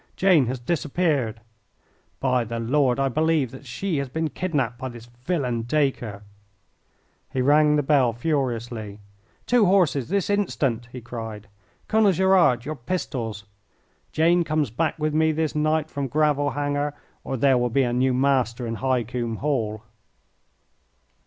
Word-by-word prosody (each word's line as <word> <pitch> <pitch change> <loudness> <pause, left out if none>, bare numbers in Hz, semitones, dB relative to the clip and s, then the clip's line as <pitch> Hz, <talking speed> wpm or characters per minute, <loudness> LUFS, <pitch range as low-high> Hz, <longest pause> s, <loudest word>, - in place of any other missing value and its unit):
Jane 175 -9 +4
has 130 +2 -2
disappeared. 140 -4 -1 0.8
By 130 -2 +1
the 115 +1 -5
Lord, 130 +2 +1
I 135 - +2
believe 155 -1 +1
that 135 +1 -12
she 170 +7 -2
has 140 -1 -2
been 160 +2 -2
kidnapped 135 -10 -2
by 130 -1 -4
this 120 -1 -11
villain 125 0 -2
Dacre." 120 -5 -1 1.1
He 130 - -2
rang 150 +3 +4
the 145 - +1
bell 135 -4 +3
furiously. 120 -5 -2 0.5
"Two 245 -5 +4
horses, 155 -9 +2
this 200 0 0
instant!" 135 - -1
he 125 - -8
cried. 115 -3 -7 0.4
"Colonel 215 -3 +4
Gerard, 180 -10 +3
your 155 +1 -4
pistols! 120 - -4 0.7
Jane 170 +2 +3
comes 155 -6 -1
back 160 +8 -1
with 155 -1 -1
me 160 +1 +3
this 155 -1 -1
night 155 0 0
from 140 -1 -3
Gravel 145 +1 +1
Hanger 145 0 -2 0.3
or 135 - -3
there 130 0 +3
will 120 0 +1
be 135 +3 +2
a 120 -1 -1
new 130 +2 +2
master 130 -3 +1
in 115 - -3
High 130 -1 +1
Combe 120 0 -3
Hall." 110 -6 -2
135 Hz, 150 wpm, -24 LUFS, 120-155 Hz, 1.1 s, Jane